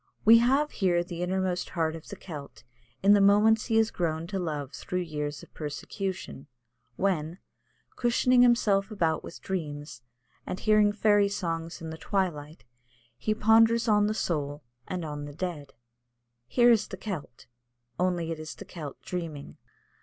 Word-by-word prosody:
We 230 +2 +9
have 270 +5 +2
here 175 -3 +1
the 175 -1 -7
innermost 185 0 -1
heart 160 -2 -1
of 160 - -10
the - - -7
Celt 150 -9 -9 0.4
in 200 +1 +7
the 205 - +5
moments 210 +2 +4
he 225 - 0
has 225 0 +3
grown 160 -2 -2
to 195 -1 -2
love 150 -6 -4
through 180 0 -3
years 150 -3 -4
of - - -16
persecution, 160 +1 -5 0.5
when, 175 -2 -1 0.6
cushioning 245 +1 +3
himself 215 -5 +3
about 165 -7 0
with - - -9
dreams, 150 -7 -5 0.4
and 185 - -5
hearing 215 -1 +4
fairy 205 -1 +3
songs 165 -4 -4
in 160 - -5
the 160 - -8
twilight, 165 -6 -2 0.5
he 215 - -1
ponders 225 +2 +4
on 210 -1 +4
the 215 - -1
soul 145 -6 -2 0.2
and 180 -3 -4
on 150 -1 -5
the 145 -1 -9
dead. 160 -5 -5 0.7
Here 240 - +5
is 220 -2 +3
the 190 - -8
Celt, 175 - -7 0.5
only 175 -2 0
it 160 - -4
is 155 0 -7
the - - -10
Celt 150 -5 -8
dreaming. 165 -5 -6
180 Hz, 160 wpm, -28 LUFS, 160-210 Hz, 0.7 s, We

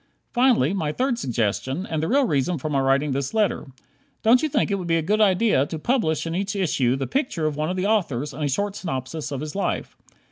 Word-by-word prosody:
Finally, 240 - +3
my 160 -6 -1
third 250 - -1
suggestion 130 - -1
and 160 -5 -2
the 160 - -1
real 275 +7 +3
reason 150 - 0
for 150 +3 -4
my 140 - +2
writing 135 +2 +2
this 135 +8 -2
letter. 210 -7 +1 0.6
Don't 235 +3 +5
you 310 - 0
think 240 - +1
it 200 - 0
would 180 - -5
be 165 - +2
a 165 - -1
good 210 +6 +1
idea 195 -7 +3
to 160 - -5
publish 160 - 0
in 165 - -3
each 195 +3 -2
issue 140 -10 +1
the 135 0 -2
picture 250 - -1
of 155 -1 0
one 155 +2 -1
of 185 - -2
the 185 - 0
authors, 150 - 0
and 150 - -5
a 145 - +1
short 200 +8 -1
synopsis 150 -2 -4
of 140 -1 -3
his 155 +2 -6
life? 200 - -2
165 Hz, 240 wpm, -23 LUFS, 140-205 Hz, 0.6 s, Don't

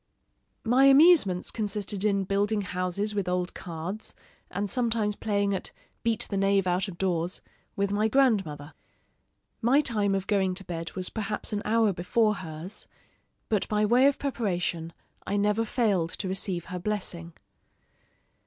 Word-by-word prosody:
My 250 +4 +4
amusements 275 - +5
consisted 205 -2 -3
in 200 -2 +2
building 205 +2 0
houses 185 +2 -2
with 200 -3 -1
old 180 0 -1
cards, 175 +5 -6 0.3
and 200 +3 -2
sometimes 225 -3 0
playing 200 -2 0
at 190 - -4 0.3
'Beat 230 -2 +1
the 200 - 0
knave 195 0 +2
out 180 +2 +1
of 180 -3 -8
doors' 175 -1 -1 0.4
with 200 0 0
my 210 +2 +2
grandmother. 195 - +1 0.9
My 250 +5 +4
time 210 -8 +1
of 195 -1 -2
going 190 -3 +1
to 195 - -4
bed 165 -2 -5
was 185 -1 -3
perhaps 210 0 -2
an 205 - -1
hour 220 -2 +3
before 210 +5 +2
hers; 165 +2 -7 0.6
but 210 -3 0
by 210 0 +1
way 245 +5 +5
of 280 - +2
preparation, 180 - -2 0.4
I 205 - 0
never 210 +2 +2
failed 210 -7 +1
to 195 - -3
receive 185 -2 -2
her 180 - -3
blessing. 175 -4 -3
200 Hz, 150 wpm, -27 LUFS, 180-215 Hz, 0.9 s, amusements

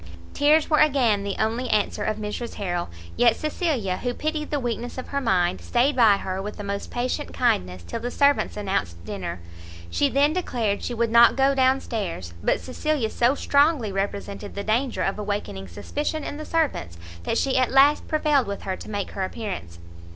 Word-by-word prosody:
Tears 300 +2 +4
were 305 - +3
again 255 -9 +3
the 200 -1 -3
only 230 +4 -1
answer 210 -1 +1
of 215 - -1
Mrs 215 +3 -5
Harrel; 175 - -2 0.3
yet 235 -2 +4
Cecilia, 285 - -1
who 245 -1 -3
pitied 305 0 -2
the 295 - 0
weakness 240 0 -4
of 255 - -6
her 280 - -1
mind, 185 -7 +1
stayed 255 +4 +1
by 220 -5 +6
her 190 -1 -4
with 210 +2 -6
the 205 - -6
most 200 0 -4
patient 255 +4 -3
kindness 90 - 0
till 230 - -5
the 240 +2 -3
servants 280 -1 +2
announced 95 - -2
dinner. 85 - -5 0.5
She 285 - +2
then 285 +3 +3
declared 235 - -1
she 245 - -3
would 230 0 0
not 235 +1 +7
go 275 +1 +3
down 265 0 +3
stairs; 170 - -4
but - - +2
Cecilia 260 -3 -2
so 245 +3 +2
strongly 285 -6 +2
represented 200 +1 -4
the 200 - -3
danger 235 +5 0
of 195 +2 -1
awakening 205 - -4
suspicion 290 - -3
in 290 - -5
the 310 - -6
servants, 285 - -1 0.2
that 225 - -1
she 270 -1 +1
at 255 -2 +3
last 280 +2 +4
prevailed 300 -5 +2
with 200 0 -5
her 190 - -2
to - - -10
make 205 -2 -3
her 195 - -3
appearance. 185 - -5
235 Hz, 190 wpm, -24 LUFS, 200-280 Hz, 0.5 s, not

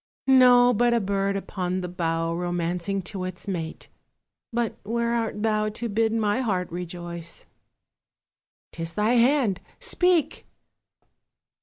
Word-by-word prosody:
No, 250 -2 +6
but 240 +2 +3
a - - +3
bird 195 -1 0
upon 185 -2 -3
the 180 - -4
bough 165 -1 -1
Romancing 175 +2 -2
to 190 0 -6
its 185 +2 -6
mate, 165 -4 -4 0.6
but 235 -1 -1
where 235 +2 -1
art 225 -2 -2
thou 215 -1 +1
To 225 +3 -4
bid 220 +2 +1
my 220 +1 +1
heart 185 -8 -1
rejoice? 170 -1 -6 1.3
'Tis 165 0 -6
thy 210 +2 +2
hand, 240 -5 +3 0.2
speak! 360 - +1
200 Hz, 125 wpm, -25 LUFS, 180-235 Hz, 1.3 s, No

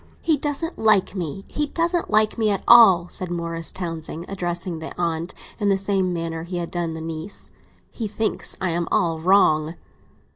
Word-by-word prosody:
"He 325 -2 +2
doesn't 295 +4 -3
like 215 -4 +3
me—he 195 - -4
doesn't 340 +2 0
like 215 0 +3
me 220 -2 +1
at 200 -2 -1
all," 195 -8 +8
said 185 - -4
Morris 170 -1 -3
Townsend, 165 -2 -5
addressing 175 -2 -3
the 160 - -8
aunt 170 0 -2 0.2
in 205 -2 +1
the 195 - +3
same 195 -1 0
manner 165 -1 -3
as 165 - -9
he 180 - -3
had 170 -1 -4
done 170 -2 -2
the 160 - -6
niece. 165 +4 -6 0.4
"He 225 - -4
thinks 215 +1 -1
I'm 170 -2 -1
all 165 -2 +1
wrong." 160 -3 +3
180 Hz, 175 wpm, -23 LUFS, 165-210 Hz, 0.4 s, all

